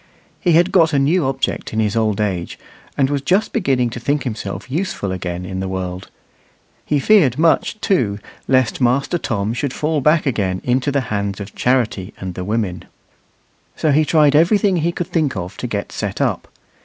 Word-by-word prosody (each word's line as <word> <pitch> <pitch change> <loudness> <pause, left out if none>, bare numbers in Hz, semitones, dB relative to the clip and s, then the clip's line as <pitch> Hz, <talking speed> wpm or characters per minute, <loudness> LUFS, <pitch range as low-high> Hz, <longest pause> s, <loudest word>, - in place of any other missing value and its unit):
He 175 - +2
had 175 +3 +4
got 165 -4 +4
a - - +3
new 145 +2 +2
object 135 -3 -2
in 110 - 0
his 110 0 0
old 110 -3 +1
age, 95 -5 -2 0.4
and 135 - +3
was 140 0 -1
just 190 +9 +1
beginning 130 - +1
to 120 - -6
think 140 +4 0
himself 105 -5 -5
useful 155 - -2
again 90 -1 -4
in 95 0 -5
the 95 - -3
world. 95 -1 -5 0.7
He 150 - 0
feared 150 - +4
much, 165 +6 +2
too, 120 - +1 0.3
lest 130 -1 +2
Master 135 +7 +1
Tom 110 -4 -2
should 125 +2 -2
fall 155 -1 -1
back 155 +3 +3
again 100 -8 0
into 130 +3 +1
the 140 0 +1
hands 100 -1 -2
of 100 -1 -8
Charity 115 -6 0
and 95 -1 -5
the 90 - -5
women. 105 -3 -2 0.9
So 155 - +1
he 155 +2 +4
tried 150 -2 +4
everything 185 +4 +4
he 170 +1 +1
could 175 - -3
think 155 -6 -1
of 90 +1 -5
to 125 - -4
get 105 -3 -4
set - - -4
up. - - -1
130 Hz, 190 wpm, -19 LUFS, 100-155 Hz, 0.9 s, had